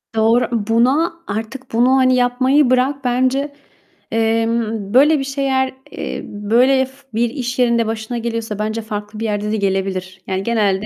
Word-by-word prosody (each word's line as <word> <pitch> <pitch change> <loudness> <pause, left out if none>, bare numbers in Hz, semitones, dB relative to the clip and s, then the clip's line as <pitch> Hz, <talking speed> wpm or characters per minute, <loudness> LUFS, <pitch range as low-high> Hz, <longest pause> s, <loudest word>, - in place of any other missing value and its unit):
Doğru. 225 +3 +3 0.2
Buna 265 +9 +2
artık 225 +5 -5
bunu, 250 +3 +4
hani, 255 -1 +4
yapmayı 255 +3 +3
bırak 265 +2 +1
bence. 260 +3 0 0.6
Emm, 225 -2 0
böyle 295 +3 +5
bir - - -2
şeyler, 270 -1 -1 0.2
eee, - - -5
böyle, 245 +6 +2
f 265 - -15 0.2
bir 235 +1 +1
iş 245 -1 -4
yerinde 235 -2 +3
başına 225 +2 -4
geliyorsa 230 -2 -4
bence 215 +1 -2
farklı 210 0 -6
bir 225 - -2
yerde 210 0 -2
de 220 - 0
gelebilir. 190 -1 -2
Yani 190 0 -2
genelde 210 -3 +1
235 Hz, 155 wpm, -18 LUFS, 215-260 Hz, 0.6 s, böyle